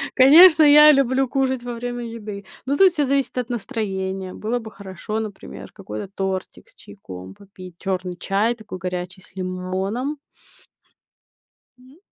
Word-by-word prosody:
Конечно, 315 Hz, +5 st, +8 dB
я 300 Hz, +1 st, +8 dB
люблю 270 Hz, -1 st, +2 dB
кушать 265 Hz, -2 st, -1 dB
во 245 Hz, 0 st, -5 dB
время 245 Hz, 0 st, -5 dB
еды, 210 Hz, -3 st, -8 dB, 0.2 s
но 275 Hz, +2 st, 0 dB
тут 380 Hz, +5 st, +6 dB
всё 300 Hz, -4 st, 0 dB
зависит 270 Hz, -2 st, -1 dB
от 245 Hz, -1 st, -2 dB
настроения. 195 Hz, -5 st, -4 dB
Было 230 Hz, +3 st, -3 dB
бы 225 Hz, -2 st, -9 dB
хорошо, 200 Hz, +2 st, -6 dB
например, 130 Hz, -, -8 dB
какой-то 105 Hz, -, -8 dB
тортик 190 Hz, -, -4 dB
с -, -, -23 dB
чайком 95 Hz, -, -11 dB
попить, 185 Hz, -3 st, -14 dB
чёрный 185 Hz, -2 st, -3 dB
чай 210 Hz, +5 st, 0 dB
такой 215 Hz, -5 st, -10 dB
горячий 180 Hz, 0 st, -5 dB
с 180 Hz, -, -21 dB
лимоном. 190 Hz, +9 st, -3 dB, 1.6 s
М, 255 Hz, +4 st, -20 dB
215 Hz, 145 wpm, -22 LUFS, 190-260 Hz, 1.6 s, Конечно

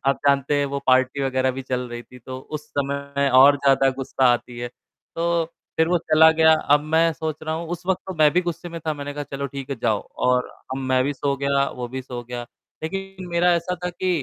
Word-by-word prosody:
आप 135 Hz, -, +3 dB
जानते 140 Hz, +1 st, +2 dB
हैं 145 Hz, -, +2 dB
वो 140 Hz, 0 st, -3 dB
पार्टी 130 Hz, +1 st, +3 dB
वगैरह 130 Hz, -1 st, +1 dB
भी 135 Hz, +1 st, -6 dB
चल 130 Hz, -1 st, -2 dB
रही 120 Hz, 0 st, -7 dB
थी, 125 Hz, -, -15 dB
तो 130 Hz, +2 st, -8 dB
उस 150 Hz, +2 st, -7 dB
समय 140 Hz, 0 st, -1 dB
और 140 Hz, +2 st, +8 dB
ज़्यादा 135 Hz, -1 st, +3 dB
गुस्सा 135 Hz, 0 st, -1 dB
आती 120 Hz, 0 st, -4 dB
है, 120 Hz, 0 st, -4 dB, 0.5 s
तो 170 Hz, 0 st, +1 dB, 0.3 s
फिर 160 Hz, +1 st, +4 dB
वो 175 Hz, -1 st, +3 dB
चला 160 Hz, -1 st, +5 dB
गया। 160 Hz, 0 st, +5 dB, 0.2 s
अब 145 Hz, -, +3 dB
मैं 165 Hz, 0 st, +4 dB
सोच 155 Hz, -1 st, -4 dB
रहा 155 Hz, 0 st, -2 dB
हूँ 165 Hz, +1 st, -4 dB
उस 175 Hz, 0 st, -5 dB
वक़्त 190 Hz, -1 st, +1 dB
तो 190 Hz, -, -5 dB
मैं 150 Hz, -1 st, +6 dB
भी 180 Hz, -, +3 dB
गुस्से 175 Hz, 0 st, -4 dB
में 165 Hz, -1 st, -7 dB
था, 155 Hz, -, 0 dB
मैंने 145 Hz, 0 st, -6 dB
कहा, 145 Hz, -, -4 dB
"चलो 140 Hz, 0 st, -2 dB
ठीक 135 Hz, 0 st, -7 dB
है 135 Hz, -, -2 dB
जाओ 110 Hz, -3 st, +2 dB, 0.3 s
और 125 Hz, 0 st, +2 dB
अब 130 Hz, -, -8 dB
मैं 130 Hz, -1 st, +1 dB
भी 145 Hz, -, 0 dB
सो 140 Hz, 0 st, -1 dB
गया, 140 Hz, 0 st, +2 dB
वो 125 Hz, -1 st, -6 dB
भी 130 Hz, +1 st, -5 dB
सो 125 Hz, -2 st, -7 dB
गया।" 120 Hz, 0 st, -5 dB, 0.4 s
लेकिन 195 Hz, +2 st, -5 dB
मेरा 175 Hz, +1 st, +3 dB
ऐसा 170 Hz, +2 st, -1 dB
था 180 Hz, -, -1 dB
कि 185 Hz, +2 st, -3 dB
140 Hz, 240 wpm, -23 LUFS, 130-160 Hz, 0.5 s, और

